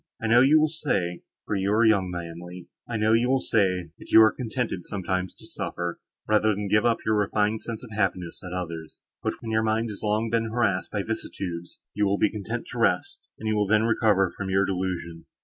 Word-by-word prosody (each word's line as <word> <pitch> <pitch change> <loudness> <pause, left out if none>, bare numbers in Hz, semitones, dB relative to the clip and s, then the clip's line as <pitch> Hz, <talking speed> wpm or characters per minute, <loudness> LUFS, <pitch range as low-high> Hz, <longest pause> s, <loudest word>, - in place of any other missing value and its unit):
I 115 - -5
know 115 +2 +6
you 145 +4 +6
will 155 - +4
say, 100 - -2 0.2
(for 105 - -2
you 100 +1 0
are 110 +2 +4
young, 100 -4 +3
my 85 -1 -4
Emily) 90 +2 -9 0.2
I 115 - -1
know 110 +1 +3
you 120 +2 +3
will 135 0 +3
say, 95 -8 +1
that - - -13
you - - +8
are 110 - +5
contented 115 -6 -3
sometimes 95 -1 -3
to - - -16
suffer, 85 -1 -4 0.3
rather 110 0 +3
than 105 0 -3
to - - -3
give 105 +3 +4
up 115 -1 +1
your 110 - +2
refined 105 +1 +1
sense 115 -1 -6
of 120 - -11
happiness, 90 -4 -1
at 90 - -7
others; 85 -3 -6 0.2
but, - - -1
when 115 - -5
your 110 0 +2
mind 110 +1 0
has 100 - -8
been - - -2
long 110 +2 0
harassed 115 -4 0
by 105 -2 -2
vicissitude, 90 -5 -4 0.3
you 105 -1 +1
will 100 +1 +1
be 105 - +2
content 105 -4 -4
to - - -5
rest, - - 0
and 110 - -5
you 110 - +1
will 105 -1 +1
then 110 +2 +4
recover 105 -5 +2
from 95 -1 -4
your 95 +1 +3
delusion. 90 -3 -3
105 Hz, 230 wpm, -26 LUFS, 90-110 Hz, 0.3 s, you